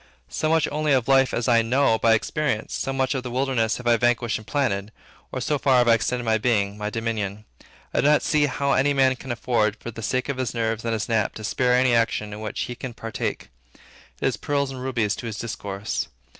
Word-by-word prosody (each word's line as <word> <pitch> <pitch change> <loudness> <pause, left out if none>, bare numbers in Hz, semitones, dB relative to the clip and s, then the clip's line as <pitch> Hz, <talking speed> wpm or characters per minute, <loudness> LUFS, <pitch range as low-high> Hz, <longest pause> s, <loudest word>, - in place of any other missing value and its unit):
So 155 - -1
much 160 -1 +3
only 150 -1 +1
of 130 -3 +2
life 135 -1 +4
as 120 - -1
I 120 -2 +5
know 115 0 +2
by 115 -1 +5
experience, 115 -1 -2
so 135 - -2
much 135 0 0
of 135 - -2
the 125 - -6
wilderness 125 -3 0
have 125 - -10
I 120 -1 +4
vanquished 120 -1 +1
and 110 - -15
planted, 105 -8 -1 0.4
or 130 - -3
so 145 +3 -1
far 130 -2 +3
have 120 -1 +4
I 115 - +7
extended 120 +2 0
my 110 -1 +1
being, 105 -4 +1
my 105 0 -3
dominion. 110 -2 -3 0.5
I - - +2
do - - +3
not 150 0 +4
see 150 -1 +2
how 140 +1 -1
any 140 +1 +2
man 130 -1 +4
can 130 0 -7
afford, 115 -3 0
for 120 - -8
the 115 - -8
sake 130 +5 -1
of 140 -2 -3
his 130 -3 -2
nerves 115 -1 -1
and 115 -1 -1
his 110 -1 -2
nap, 110 -3 0
to 110 - -8
spare 125 +3 +2
any 125 -1 +3
action 115 -2 +1
in 105 - -7
which 110 - -4
he 125 - -3
can 120 0 -7
partake. 115 0 -4 0.3
It - - -23 0.5
is - - +1
pearls 140 -1 -1
and 130 -1 -7
rubies 120 -6 0
to 120 - -6
his 110 -2 -5
discourse. 100 -3 -4
120 Hz, 240 wpm, -24 LUFS, 110-130 Hz, 0.5 s, I